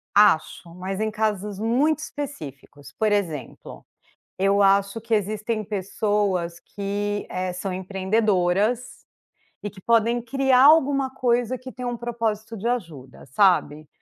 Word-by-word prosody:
Acho, 170 -3 +3
mas 190 +2 -5
em 220 0 0
casos 210 -2 -2
muito 265 +8 +1
específicos, 150 - -8
por 215 -1 0
exemplo. 165 - -4 0.5
Eu 195 +1 +2
acho 200 +2 +3
que 230 +1 -1
existem 215 +2 -1
pessoas 195 -3 -1
que, 205 +1 -4
eh, 185 0 -2
são 185 +1 -4
empreendedoras, 195 +3 0 0.6
e 205 - -3
que 190 - -15
podem 235 +2 +2
criar 265 +1 +3
alguma 280 -3 +5
coisa 245 -1 +1
que 255 +1 -10
tem 250 -1 -7
um 240 -1 -2
propósito 225 -2 -3
de 210 - -5
ajuda, 165 - -4
sabe. 155 - +2
210 Hz, 130 wpm, -24 LUFS, 190-235 Hz, 0.6 s, alguma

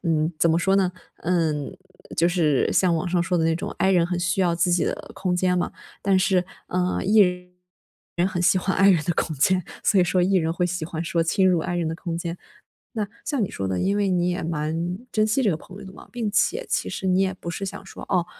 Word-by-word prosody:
嗯， 160 -1 +1
怎 165 - +3
么 165 - +3
说 195 +2 +2
呢？ 190 -2 +2 0.3
嗯， 160 -5 -1 0.4
就 165 - +4
是 165 -6 +2
像 180 -2 +3
网 180 - -2
上 175 -1 +1
说 175 +1 0
的 165 - +1
那 165 0 +2
种 165 - -4
I 190 +2 +3
人 175 -2 +4
很 180 0 -2
需 175 +2 0
要 175 -2 +2
自 175 +1 +1
己 175 -2 +2
的 - - -4
空 180 -2 -1
间 180 0 +1
嘛， - - -1 0.3
但 195 -1 +2
是， 185 -1 +2 0.2
呃 180 0 -1
，E 210 +3 +5 1.0
人 175 +1 +2
很 175 -2 -2
喜 185 +2 +4
欢 190 +1 -1
I 195 +1 +6
人 165 -5 +3
的 175 - +1
空 160 - -1
间， 185 +5 +2 0.2
所 200 - +4
以 - - +4
说 180 +1 +1
E 190 +2 +2
人 165 -3 +2
会 175 +1 0
喜 180 -2 -3
欢 160 0 -4
说 170 0 0
侵 185 +3 +2
入 180 -3 +2
I 175 +2 -3
人 170 -2 -1
的 160 - -3
空 170 0 -4
间。 170 0 -4 0.6
那 210 - 0 0.2
像 280 -8 0
你 - - -3
说 95 -1 -3
的， 95 -1 -1
因 200 +2 +1
为 205 -1 +1
你 180 -1 +1
也 180 +1 -2
蛮 165 +3 -2
珍 215 0 +2
惜 255 +5 +1
这 210 - +3
个 155 - -1
朋 190 +4 -13
友 - - -10
的 190 - -10
嘛， - - -14
并 230 -4 -2
且 445 - +1
其 - - 0
实 190 - -5
你 185 0 +3
也 190 -1 +1
不 170 -2 -8
是 195 +3 -4
想 190 0 -7
说， - - -10
哦， 180 -3 +2
180 Hz, 275 characters per minute, -24 LUFS, 170-190 Hz, 1.0 s, I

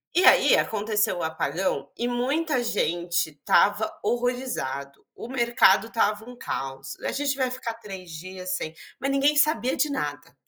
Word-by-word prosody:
E 360 - +4
aí - - +7
aconteceu 210 -2 0
o - - -3
apagão 160 -2 -1
e 240 - -1
muita 260 +3 0
gente 175 -6 0
estava 205 +8 +3 0.2
horrorizado. 240 - -2
O - - -8
mercado 235 -5 +3
estava 215 -1 0
um 250 - -10
caos. 135 - -5
"A - - -2
gente 280 -1 -1
vai 255 -1 0
ficar 255 -2 -4
3 190 -4 -9
dias 185 +3 -5
sem" 160 -3 -4 0.3
Mas 275 +2 -1
ninguém 275 +2 +3
sabia 295 -3 +2
de 300 +3 +1
nada. 145 - -4
215 Hz, 155 wpm, -25 LUFS, 170-255 Hz, 0.3 s, aí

